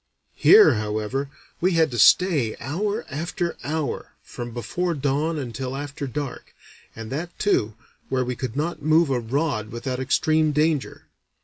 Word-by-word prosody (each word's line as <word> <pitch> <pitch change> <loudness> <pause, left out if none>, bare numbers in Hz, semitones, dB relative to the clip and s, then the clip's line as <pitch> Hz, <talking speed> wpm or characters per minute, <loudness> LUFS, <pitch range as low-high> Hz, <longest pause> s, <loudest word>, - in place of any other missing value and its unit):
Here, 425 - +7
however, 110 +6 -2 0.3
we 185 +2 +2
had 160 -3 +3
to 120 - -3
stay, 145 - +4
hour 200 - -2
after 170 +4 -3
hour, 155 0 -3
from 120 0 -7
before 170 +9 -2
dawn 145 +3 0
until 130 -1 -4
after 145 0 -5
dark, 140 +1 -6 0.4
and 115 +1 -8
that, 170 +5 -5
too, 110 - +1 0.3
where 130 -1 0
we 125 0 -3
could 125 -1 -5
not 155 +2 -2
move 155 0 +3
a 125 - +1
rod 120 -2 -1
without 125 +2 -4
extreme 155 +3 +2
danger. 150 -1 0
140 Hz, 145 wpm, -24 LUFS, 125-160 Hz, 0.4 s, Here